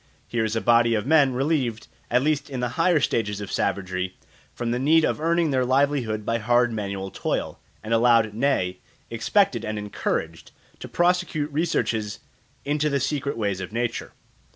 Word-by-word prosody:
Here 120 -1 -1
is 110 0 -1
a 115 - 0
body 120 -1 +4
of 105 - -1
men 145 -3 +4
relieved, 130 -5 -1 0.2
at 125 +2 +2
least 145 -1 0
in 130 -2 -4
the 125 0 -1
higher 165 +4 +2
stages 105 -6 -1
of 100 -2 -6
savagery, 95 -1 -2 0.3
from 120 -1 -3
the 120 - 0
need 155 +4 +4
of - - -1
earning 165 -1 +2
their 130 -1 +2
livelihood 130 -5 +1
by 115 +1 0
hard 120 +1 +2
manual 100 -2 -4
toil, - - -3 0.2
and 110 +1 -2
allowed, 115 -2 +4
nay, 105 -7 0 0.3
expected 120 - +1
and 110 -1 -3
encouraged, 85 -5 -3 0.3
to - - -7
prosecute 175 -4 0
researches 120 - -1 0.5
into 150 +1 +1
the 140 -1 0
secret 140 0 -2
ways 100 -4 -1
of 95 - -6
nature. 120 +1 -3
120 Hz, 170 wpm, -24 LUFS, 110-145 Hz, 0.5 s, body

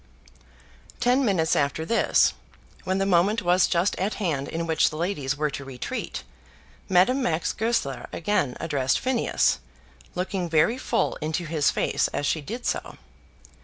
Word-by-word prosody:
Ten 250 +3 +3
minutes 180 -8 +2
after 140 +3 0
this, 230 +6 +3 0.5
when 185 +1 0
the 195 - +1
moment 195 +4 +2
was 180 +1 +4
just 175 +3 +1
at 195 +4 -1
hand 150 -9 -2
in 165 +1 -3
which 160 -1 +3
the - - -8
ladies 150 -5 -2
were 150 0 0
to 140 - -6
retreat, 130 -2 -5 0.7
Madame 190 +9 +4
Max 165 -9 0
Goesler 220 - -1
again 165 -8 -1
addressed 140 -5 0
Phineas, 255 - +1 0.6
looking 180 -1 -2
very 165 +10 +3
full - - 0
into 160 +3 -3
his 150 -3 +1
face - - +1
as 145 - -3
she 155 +2 0
did 235 - -6
so. - - -3
170 Hz, 150 wpm, -25 LUFS, 150-205 Hz, 0.7 s, was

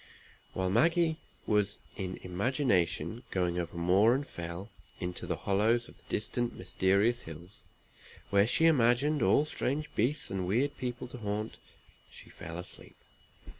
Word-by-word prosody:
While 95 -1 0
Maggie 165 - +3 0.3
was 105 -1 +1 0.2
in 95 -2 -4
imagination 95 - 0
going 90 -2 0
over 85 0 -4
moor 95 +7 +4
and 140 +2 -2
fell, 85 +5 -6 0.3
into 90 -1 -4
the - - 0
hollows 110 +4 +1
of - - -15
the - - -25
distant 120 +3 -1
mysterious 100 +6 +2
hills, 85 +5 -10 0.7
where 100 +1 +5
she 160 +7 +3
imagined 140 0 +4
all 105 +10 +4
strange 150 0 -2
beasts 130 +7 0
and 95 -2 -2
weird 135 +9 +1
people 125 -1 -4
to 125 - -8
haunt, 105 +1 -3 0.5
she - - -13
fell 80 +1 -7
asleep. 90 - -8
105 Hz, 140 wpm, -31 LUFS, 90-125 Hz, 0.7 s, where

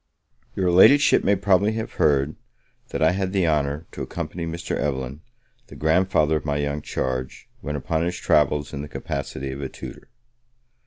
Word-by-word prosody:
Your 90 -2 +1
Ladyship 140 +11 +6
may 100 - +3
probably 100 +2 +2
have 110 0 -4
heard, 70 0 +3 0.5
that - - -1
I 80 - +5
had 95 0 -2
the 95 -4 +2
honour 75 0 0
to - - -8
accompany 85 0 -5
Mr. 85 +1 -4
Evelyn, 70 0 -3 0.5
the - - -12
grandfather 80 -1 +2
of - - -6
my 75 -1 -1
young 70 0 -2
charge, 65 -2 -4
when 75 - -4
upon 80 +3 -1
his 90 +1 -2
travels, 75 0 +1
in 70 - -4
the 75 - -6
capacity 70 -1 -5
of 70 +1 -6
a 70 - -4
tutor. - - -10
75 Hz, 170 wpm, -23 LUFS, 70-90 Hz, 0.5 s, Ladyship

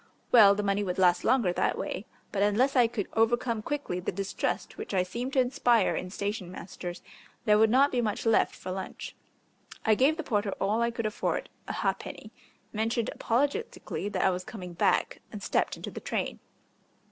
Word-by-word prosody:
Well, 205 -4 +8
the 210 - -2
money 200 0 +1
would 180 -2 -3
last 180 -2 +4
longer 235 -8 +3
that - - 0
way, 195 - -4 0.2
but 200 - -1
unless 225 +7 +3
I 245 -2 +6
could 225 -4 -3
overcome 230 0 +1
quickly 280 -8 -3
the 180 - -2
distrust 195 +1 -3
which - - -5
I 185 - +3
seemed 240 +8 -5
to 270 - +3
inspire 245 -4 +3
in 185 - -4
station 200 -1 -4
masters 180 -1 -7 0.4
there 210 -1 +5
would 220 0 +5
not 270 +5 +4
be 245 - +1
much 215 -1 -2
left 225 -1 +3
for 185 - -7
lunch. 190 0 -6 0.7
I 220 - +5
gave 275 +8 +3
the 325 - -3
porter 205 -6 0
all 210 +4 +1
I 235 - +2
could 230 -1 -4
afford 215 - -2 0.2
a - - -3
ha'penny, - - -3 0.4
mentioned 225 +1 0
apologetically 280 - -1
that - - 0
I 190 - +4
was 180 0 -3
coming 180 -4 -8
back, 170 - +1
and - - -7
stepped - - 0
into - - -7
the - - -7
train. - - -3
215 Hz, 190 wpm, -29 LUFS, 195-240 Hz, 0.7 s, Well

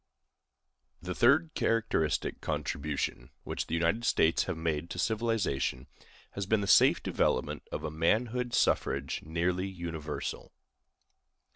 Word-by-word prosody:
The 90 +1 -5
third 145 - +4
characteristic 105 -10 0
contribution 75 0 -3
which - - -4
the 80 - -1
United 85 +8 +1
States 80 -8 +3
have 95 -4 -3
made 80 0 -2
to 85 - -6
civilization 100 - 0 0.5
has 100 -1 -4
been 110 0 +2
the - - -1
safe 95 - +5
development - - 0
of - - -4
a 80 - -3
manhood 115 +10 0
suffrage - - +1
nearly 90 +4 -1
universal. 85 -5 -5
90 Hz, 120 wpm, -30 LUFS, 80-110 Hz, 0.5 s, safe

